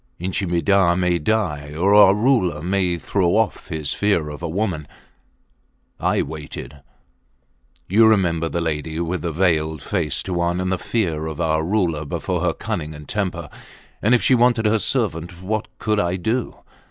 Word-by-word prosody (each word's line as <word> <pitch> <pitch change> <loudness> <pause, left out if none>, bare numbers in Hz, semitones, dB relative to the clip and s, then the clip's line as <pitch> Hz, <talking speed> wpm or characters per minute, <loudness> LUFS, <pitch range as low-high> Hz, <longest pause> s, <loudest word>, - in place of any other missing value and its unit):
Inchi 95 +2 -2
Midah 85 +1 +3
may 90 -1 +1
die 75 -6 -1
or 95 +5 +2
our 105 -1 +7
Ruler 105 - +1
may 90 -1 0
throw 90 +2 0
off 110 -1 0
his 80 -5 -2
fear 100 -7 +1
of 75 +1 -8
a 85 - -3
woman!... 85 -4 -2 1.1
I - - +1
waited!... 75 -2 -8 1.1
You 110 +4 +5
remember 85 -6 +2
the 85 - -2
lady 80 0 -3
with 85 0 -2
the 85 - -2
veiled 80 -3 0
face, 85 -8 -1
Tuan, 85 -1 -1
and 95 0 -1
the 95 - -1
fear 80 -9 -1
of 80 0 -6
our 80 -1 +1
Ruler 85 -4 0
before 70 - -3
her - - +1
cunning 75 +1 -4
and 75 -1 -11
temper. 90 -5 -2 0.5
And 115 +4 +4
if 120 - +1
she 135 - +4
wanted 120 -2 +3
her 110 +1 +3
servant, 90 -9 -2
what 110 +3 -2
could 105 -1 0
I 85 -1 0
do? 110 +6 -2
90 Hz, 165 wpm, -21 LUFS, 80-105 Hz, 1.1 s, our